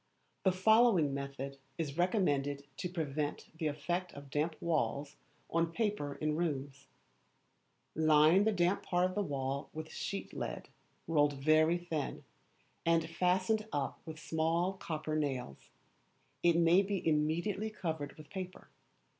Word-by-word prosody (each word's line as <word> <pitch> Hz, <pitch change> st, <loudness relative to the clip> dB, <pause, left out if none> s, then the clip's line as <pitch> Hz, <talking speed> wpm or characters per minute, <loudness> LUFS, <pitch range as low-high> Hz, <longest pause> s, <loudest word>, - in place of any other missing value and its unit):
The 190 Hz, -, +4 dB
following 190 Hz, -, +4 dB
method 140 Hz, 0 st, -5 dB, 0.2 s
is 150 Hz, -4 st, -3 dB
recommended 145 Hz, -7 st, +1 dB
to 180 Hz, -, -3 dB
prevent 150 Hz, -4 st, -3 dB
the 160 Hz, -, 0 dB
effect 175 Hz, +5 st, -2 dB
of 140 Hz, -1 st, -10 dB
damp 155 Hz, +3 st, 0 dB
walls 145 Hz, -3 st, -1 dB, 0.4 s
on 165 Hz, 0 st, +1 dB
paper 205 Hz, -11 st, -1 dB
in 155 Hz, 0 st, -1 dB
rooms: 140 Hz, -4 st, -3 dB, 1.1 s
Line 155 Hz, +4 st, +5 dB
the 220 Hz, -, +3 dB
damp 180 Hz, 0 st, +2 dB
part 180 Hz, -1 st, +1 dB
of 185 Hz, -, -1 dB
the 205 Hz, -, 0 dB
wall 140 Hz, -5 st, -2 dB
with 155 Hz, 0 st, -6 dB
sheet 200 Hz, -, -4 dB
lead, -, -, -5 dB, 0.4 s
rolled 145 Hz, -3 st, +3 dB
very 155 Hz, +4 st, +4 dB
thin, 165 Hz, -4 st, -4 dB, 0.6 s
and 165 Hz, -1 st, +3 dB
fastened 185 Hz, +5 st, +1 dB
up 140 Hz, -2 st, -2 dB
with 160 Hz, -1 st, -8 dB
small 165 Hz, +4 st, 0 dB
copper 155 Hz, -4 st, -4 dB
nails. 135 Hz, -, -3 dB, 0.7 s
It 170 Hz, -1 st, +4 dB
may 170 Hz, +3 st, +6 dB
be 195 Hz, -3 st, -2 dB
immediately 170 Hz, +8 st, +1 dB
covered 160 Hz, -8 st, -4 dB
with 155 Hz, -1 st, -13 dB
paper. 185 Hz, -2 st, -7 dB
160 Hz, 135 wpm, -33 LUFS, 145-180 Hz, 1.1 s, may